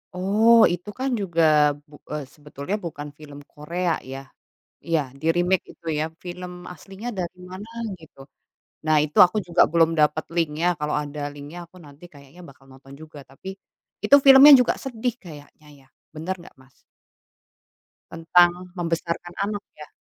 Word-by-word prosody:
Oh 215 +5 +4 0.2
itu 180 +4 -7
kan 265 +1 -1
juga 170 -4 -1 0.5
bu 145 - -22 0.2
eee, 150 -1 -4
sebetulnya 150 +4 -6
bukan 150 -3 -6
film 145 -2 -11
Korea 170 +4 -3 0.2
ya. 135 - -6 0.7
Iya 165 -2 +1 0.2
di-remake 175 +3 +1
itu 170 - -23
ya, 155 - 0 0.2
film 180 0 -7 0.2
aslinya 195 +5 -10
dari 180 0 -5
mana 195 +4 -9 0.3
gitu. 160 -3 -18 0.7
Nah, 155 0 +3
itu 150 - -11
aku 180 +4 -4
juga 170 0 +2
belum 165 -1 +3
dapat 150 +1 +1
linknya, 165 0 0
kalau 150 0 -2
ada 145 0 -7
linknya 145 +4 -10
aku 185 - -20
nanti 145 +3 -17
kayaknya 140 +4 -16
bakal 135 0 -20
nonton 135 +1 -16
juga. 155 -2 -12
Tapi 165 +8 -10 0.6
itu 285 - +7
filmnya 275 +2 +10
juga 250 - +1
sedih 245 -2 -3
kayaknya 150 -1 -14 0.2
ya, - - -29 0.3
benar 165 +5 -3
nggak 170 - -16
Mas? 130 0 -23 1.4
Tentang 175 +2 +2
membesarkan 170 0 -4
anak 205 0 -4
ya? 150 -1 -11
170 Hz, 150 wpm, -23 LUFS, 150-185 Hz, 1.4 s, filmnya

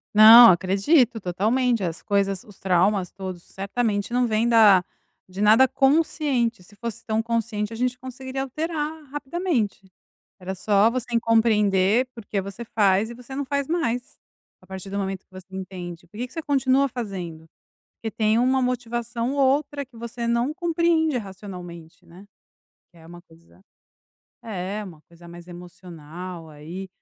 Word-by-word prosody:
Não. 225 +2 +10
Acredito, 200 - +2
totalmente. 220 +6 0
As 170 -2 -4
coisas 195 -2 0
os 205 -3 -17
traumas, 185 0 +1
todos 185 -3 -7
certamente, 205 +1 -2
não 250 0 +2
vem 225 +1 +1
da 210 -6 +6 0.4
de 185 +2 -7
nada 220 +5 +6
consciente. 270 - +1
Se 205 - -19
fosse 230 +1 -7
tão 220 0 0
consciente, 225 -2 -2
a - - -6
gente 250 +1 -1
conseguiria 260 +1 -6
alterar, 310 +2 -4
rapidamente. 280 - -3 0.5
Era 190 0 -5
só 200 +3 +3
você 250 0 -3
em - - +5
compreender 220 -1 +3
por 230 -3 -10
que 200 0 -2
você 200 +4 -8
faz 205 -1 +2
e - - -8
você 250 +2 -11
não 285 +1 -2
faz 280 0 -2
mais. 260 -7 -2 0.4
A - - -21
partir 190 0 -8
do 200 - -3
momento 195 -1 -4
que - - -59
você 185 -1 -11
entende, 180 -2 -8
por 205 - -17
que 245 +3 -3
que - - -21
você 325 - -5
continua 275 -1 +2
fazendo? 185 -10 -6 0.5
Porque 225 - -5
tem 215 0 +2
uma 260 +2 +2
motivação 240 -1 -2
ou 285 - 0
outra 280 +1 +1
que 250 -2 -20
você 235 +1 -5
não 235 +4 +1
compreende 335 -3 +1
racionalmente, 180 -6 -9
né. 185 +4 -15 0.7
Que 175 - -22
é 160 - -16
uma 175 +1 -12
coisa 165 0 -22 0.8
é, 205 0 -4
uma 170 -6 -12
coisa 170 0 -16
mais 170 0 -12
emocional, 175 -1 -10
aí. 160 +6 -8
220 Hz, 160 wpm, -24 LUFS, 190-250 Hz, 0.8 s, Não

